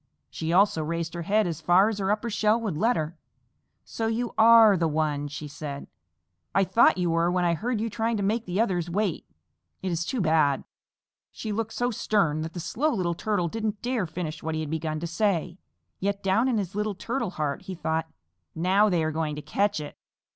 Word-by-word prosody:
She 160 0 -3
also 190 -2 +3
raised 165 +1 -3
her 170 - -4
head 210 +5 +2
as 165 -3 -4
far 175 +5 +5
as 220 -2 -2
her 195 -1 -1
upper 215 +3 0
shell 215 +2 +2
would 210 -8 -2
let 225 +10 +2
her. 160 +1 -4 0.6
"So 225 - -3
you 230 +2 -2
are 225 -2 +7
the 170 -2 +1
one," 150 -2 -1
she 150 +1 -7
said. 140 -1 -7 0.7
"I 195 - +5
thought 225 +2 +4
you 175 -2 +1
were 165 +1 +2
when 180 0 +1
I 170 - +3
heard 225 +6 -2
you 225 - -1
trying 225 +1 -1
to 200 - -2
make 220 +4 0
the 180 +3 -2
others 180 -6 0
wait. 195 -1 -1 0.6
It 185 - -1
is 170 0 -1
too 250 +8 -3
bad." 155 -6 +2 0.7
She 215 - -5
looked 225 +1 -2
so 245 0 0
stern 195 -8 +1
that 160 +1 -5
the 175 - -5
Slow 245 - 0
Little 180 -8 0
Turtle 180 0 -1
didn't 215 +3 -3
dare 240 -6 -1
finish 160 -2 -5
what 160 0 -3
he 160 - -2
had 155 -1 -5
begun 155 -1 -2
to - - -2
say, 175 -1 -1 0.4
yet 200 +1 -2
down 195 +6 +2
in 250 -4 +1
his 195 -2 -3
little 210 0 -2
Turtle 235 +2 -2
heart 150 -2 -2
he 190 - -7
thought, 160 -1 -2 0.5
"Now 190 +5 +3
they 175 -4 +1
are 155 - 0
going 155 -1 -2
to 150 - -6
catch 205 -1 0
it!" 150 -1 -8
185 Hz, 215 wpm, -26 LUFS, 160-215 Hz, 0.7 s, are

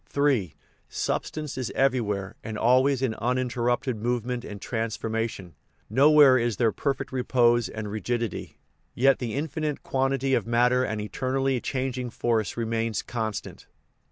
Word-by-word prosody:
III. 130 - +2 0.3
Substance 150 -4 -3
is 125 - -2
everywhere 110 -8 0
and 110 -1 -5
always 130 +3 +3
in 125 -4 +1
unin 125 +2 +1
terrupted 120 0 0
movement 120 +1 -1
and 105 -3 -8
transformation: 110 -4 -3 0.4
nowhere 140 -2 +6
is 115 -4 -1
there 115 -2 +3
perfect 135 +2 -2
repose 120 -2 +2
and 110 -1 -5
rigidity; 115 0 -3 0.4
yet 135 +2 +4
the 120 -2 -3
infinite 155 0 -3
quan 135 0 0
tity 135 0 +1
of 115 -3 -1
matter 125 +2 +3
and 110 -4 -2
of 105 - -3
eternally 130 +2 -1
changing 130 -2 -2
force 115 -1 -1
remains 115 -2 -1
constant. 110 -3 -5
120 Hz, 140 wpm, -26 LUFS, 115-130 Hz, 0.4 s, nowhere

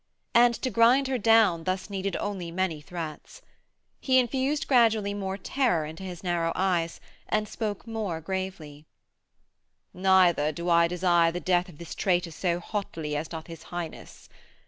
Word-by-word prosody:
And 240 0 +5
to 255 - 0
grind 245 +4 +4
her 260 -2 0
down 215 -7 +4
thus 185 0 -2
needed 195 -2 -3
only 195 -4 -4
many 170 -3 -2
threats. 165 - -8 0.6
He 260 -1 +2
infused 265 +4 +1
gradually 225 -5 +3
more 195 -1 -3
terror 215 - 0
into 160 +4 -9
his 180 -2 -7
narrow 170 -2 0
eyes, 175 -3 0 0.3
and 215 0 0
spoke 210 -2 -4
more 215 -7 -3
gravely: 165 -4 -6 1.1
'Neither 180 -5 +4
do 170 +3 -3
I 170 0 +5
desire 175 -1 +2
the 175 - -4
death 180 0 +1
of 160 - -14
this 170 0 -8
traitor 180 -3 0
so 170 +2 -1
hotly 165 -6 -4
as 150 +2 -2
doth 160 -1 -7
his 165 -1 -10
Highness. 175 -2 -7
185 Hz, 155 wpm, -27 LUFS, 170-215 Hz, 1.1 s, And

